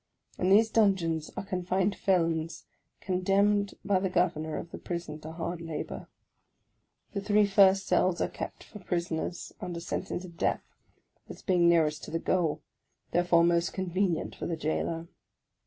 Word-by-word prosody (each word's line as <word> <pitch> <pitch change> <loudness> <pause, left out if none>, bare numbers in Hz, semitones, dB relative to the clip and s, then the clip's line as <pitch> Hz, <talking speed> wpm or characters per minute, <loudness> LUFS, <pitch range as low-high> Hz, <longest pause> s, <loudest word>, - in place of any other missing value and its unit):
In 185 - +2
these 215 +3 +5
dungeons 175 -8 +2
are - - -3
confined 185 +1 0
felons 165 -3 0 0.4
condemned 195 +2 +2
by 195 -2 +3
the 190 0 -1
Governor 160 -4 0
of 170 - -7
the - - -7
Prison 170 -3 -5
to 155 +1 -8
hard 170 +1 -4
labour. 165 -2 -5 1.1
The 200 - -2
three 210 +1 +4
first 195 -1 +5
cells 180 -1 +2
are - - +1
kept - - -7
for 210 - -12
prisoners 175 -1 -3
under 175 -1 -4
sentence 175 +1 -4
of 170 -2 -13
death, - - 0 0.7
as - - -10
being 175 -3 +4
nearest 155 -3 +2
to - - -9
the 165 - -1
goal, 160 -3 0 0.5
therefore 175 -1 +4
most 170 0 +2
convenient 185 -2 -1
for - - -5
the 165 - -2
jailor. 165 +2 -2
175 Hz, 155 wpm, -29 LUFS, 165-190 Hz, 1.1 s, these